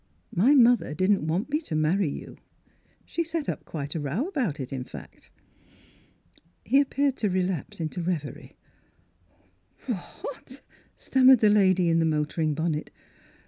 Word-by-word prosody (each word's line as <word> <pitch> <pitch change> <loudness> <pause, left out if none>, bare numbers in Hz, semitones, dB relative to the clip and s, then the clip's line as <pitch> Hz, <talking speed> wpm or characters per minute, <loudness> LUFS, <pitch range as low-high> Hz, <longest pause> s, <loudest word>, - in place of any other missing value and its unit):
My 245 +12 +4
mother 240 - +4
didn't 185 -2 +1
want 185 - -1
me 300 +2 +1
to 165 - -5
marry 155 +3 +1
you. - - -8 0.7
She 335 - -2
set 330 -2 -4
up - - -4
quite 145 -2 -5
a 165 - -3
row 155 - -2
about 245 - -2
it 135 0 -5
in 130 -2 -3
fact." - - -12 1.4
He 270 +7 +4
appeared 280 -1 0
to 210 - 0
relapse 185 -4 -2
into 165 +2 -3
revery. 165 -6 -4 1.3
"W 230 -9 -2 0.2
— - - -20
what?" - - -9 0.3
stammered 265 0 +5
the 215 -1 +4
lady 185 -3 +4
in 165 0 +3
the 165 - +2
motoring 155 0 0
bonnet. 160 -1 -2
185 Hz, 150 wpm, -26 LUFS, 155-255 Hz, 1.4 s, stammered